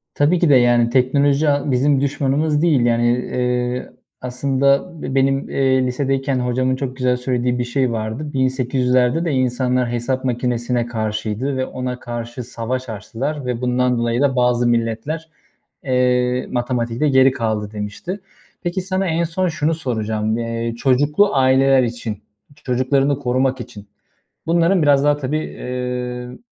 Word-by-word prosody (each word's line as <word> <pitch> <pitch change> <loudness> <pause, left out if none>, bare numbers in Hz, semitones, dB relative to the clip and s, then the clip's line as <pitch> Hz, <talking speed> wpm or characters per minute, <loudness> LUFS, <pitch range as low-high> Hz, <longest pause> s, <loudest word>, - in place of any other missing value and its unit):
Tabii 155 +5 +3
ki 170 -3 +3
de, 140 - +6
yani, 120 -1 +4
teknoloji, 140 +4 +2
a 145 -1 0
bizim 135 +2 +2
düşmanımız 145 +2 0
değil, 155 -7 +3
yani, 120 0 +2
eee, 125 0 -2 0.3
aslında 140 +5 +1
be 135 - -4
benim, 135 0 +1
eee, 130 -1 +2
lisedeyken 135 +1 -1
hocamın 130 +1 0
çok 130 -1 -5
güzel 125 -1 +1
söylediği 125 -1 -1
bir - - +1
şey 125 +1 0
vardı. 115 +7 -4
1800'lerde 130 +2 +1
de 165 - 0
insanlar 125 -1 0
hesap 130 +2 -2
makinesine 120 -1 -1
karşıydı 110 +3 -3
ve 130 - 0
ona 125 -1 -5
karşı 120 +1 -6
savaş 125 +2 -4
açtılar 125 +7 -4
ve 125 -1 -3
bundan 125 0 +1
dolayı 120 +2 0
da 135 -2 +2
bazı 125 -1 +2
milletler, 120 +8 -1 0.5
eee, 125 -1 +1
matematikte 120 +2 -1
geri 130 0 +5
kaldı, 110 -4 -2
demişti. 105 - -5 0.4
Peki, 175 +1 -2
sana 190 0 -1
en 165 +1 0
son 180 +3 -1
şunu 155 0 0
soracağım. 110 -6 -2
Eee, 115 0 -3
çocuklu 145 +9 +2
aileler 130 0 +4
için, 115 -3 -4 0.4
çocuklarını 135 +2 +1
korumak 130 0 0
için 100 -3 -11 0.6
bunların 170 +1 +3
biraz 140 -1 +4
daha, 145 0 +3
tabii, 145 +1 -2
eee, 125 -3 -5
125 Hz, 145 wpm, -20 LUFS, 120-140 Hz, 0.6 s, de